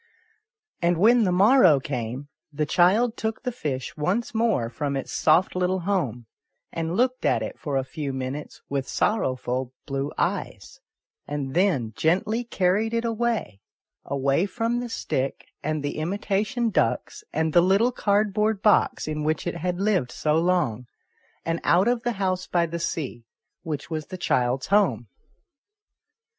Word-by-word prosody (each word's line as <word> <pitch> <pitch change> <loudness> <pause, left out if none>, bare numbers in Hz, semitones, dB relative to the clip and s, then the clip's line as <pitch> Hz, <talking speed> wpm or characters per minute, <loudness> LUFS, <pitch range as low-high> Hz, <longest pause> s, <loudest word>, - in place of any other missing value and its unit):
And 170 0 +2
when 225 +5 +5
the 185 - +2
morrow 190 - +6
came, 125 0 -4 0.2
the 150 +1 -1
child 200 - +3
took 220 0 -3
the 250 - -1
fish 140 - -4
once 185 +12 -1
more 220 - +1
from 140 +4 -3
its 135 - -5
soft 165 +5 +3
little 180 +1 0
home, 145 - -1 0.5
and 165 +2 -2
looked 255 +1 +1
at 110 - +2
it - - -6
for 140 -3 -2
a 135 - +1
few 140 +2 -5
minutes 130 +2 -6
with 140 -1 -2
sorrowful 130 - -1
blue 140 +1 -3
eyes, - - -3 0.5
and 140 -2 -4
then 160 - +1
gently 195 +9 +1
carried 215 +1 +1
it 230 0 0
away 230 - -1 0.4
away 140 +6 +1
from 230 +3 -1
the 245 0 -4
stick 135 -10 -3
and 155 -1 -2
the 145 - -3
imitation 205 - -1
ducks 425 - 0
and 160 -1 0
the 175 - +7
little 195 +7 +3
cardboard 210 -1 +1
box 210 -6 +3
in 150 -1 -2
which 155 +1 -1
it 175 -1 -3
had 180 +1 -2
lived 195 - +1
so 150 +4 0
long, 160 -9 +1 0.6
and 165 0 -1
out 180 +5 +4
of 240 -1 +1
the 240 0 -1
house 185 -2 -1
by 170 -1 +2
the 170 +1 -5
sea, 155 -8 -3 0.4
which 155 0 -5
was 155 -1 -3
the 185 - -7
child's 125 -6 0
home. 190 - +2
175 Hz, 155 wpm, -25 LUFS, 140-210 Hz, 0.6 s, the